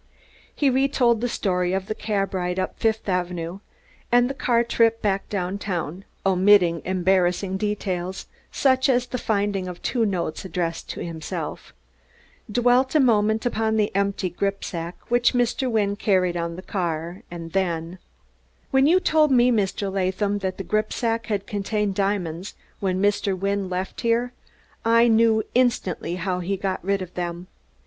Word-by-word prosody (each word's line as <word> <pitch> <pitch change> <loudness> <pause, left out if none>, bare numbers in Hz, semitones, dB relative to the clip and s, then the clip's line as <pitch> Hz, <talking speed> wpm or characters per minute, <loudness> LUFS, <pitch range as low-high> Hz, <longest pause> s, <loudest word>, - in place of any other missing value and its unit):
He 280 -3 +2
retold 255 -3 +2
the 245 - 0
story 180 -4 0
of 190 0 -1
the 215 - -3
cab 205 -3 -2
ride 180 -1 -2
up 185 - -3
Fifth 220 -1 0
Avenue, 180 -1 -2 0.5
and 245 0 +5
the - - -4
car 240 -3 +2
trip 230 -1 +2
back 200 -3 -1
downtown 185 -2 -3 0.2
omitting 185 -3 +4
embarrassing 185 +1 +1
details 190 -3 -3 0.3
such 260 -1 +2
as 250 -1 +3
the 250 0 -4
finding 200 -4 0
of 180 -1 -7
two 240 -3 +1
notes 180 -6 -2
addressed 170 -2 -3
to - - -5
himself 160 -2 -6 0.8
dwelt 245 +4 +3
a - - +6
moment 220 -3 +3
upon 220 -2 0
the 210 -3 0
empty 200 -1 0
gripsack 175 -2 -3 0.2
which 240 +1 +3
Mr. 245 +2 +1
Wynne 205 -3 +1
carried 185 -4 +1
on 170 -1 -3
the 185 - -9
car, 170 -2 -3
and 165 -1 -7
then: 175 -1 -2 0.7
"When 270 0 +4
you 355 +4 +5
told 310 -4 +3
me, 250 -1 +5
Mr. 200 -3 0
Latham, 195 +2 0
that 190 -1 -3
the 195 - -4
gripsack 225 +3 -1
had 205 -3 -2
contained 205 0 -1
diamonds 190 -3 -2 0.2
when 185 -2 0
Mr. 200 -1 +1
Wynne 195 0 -1
left 185 +1 -4
here 240 +1 +1 0.5
I 230 +1 +5
knew 225 -1 +4
instantly 230 -9 +1
how 180 0 -2
he 190 +2 -2
got 190 -2 -3
rid 195 0 0
of 180 0 -11
them. 175 0 -4
200 Hz, 155 wpm, -24 LUFS, 180-230 Hz, 0.8 s, a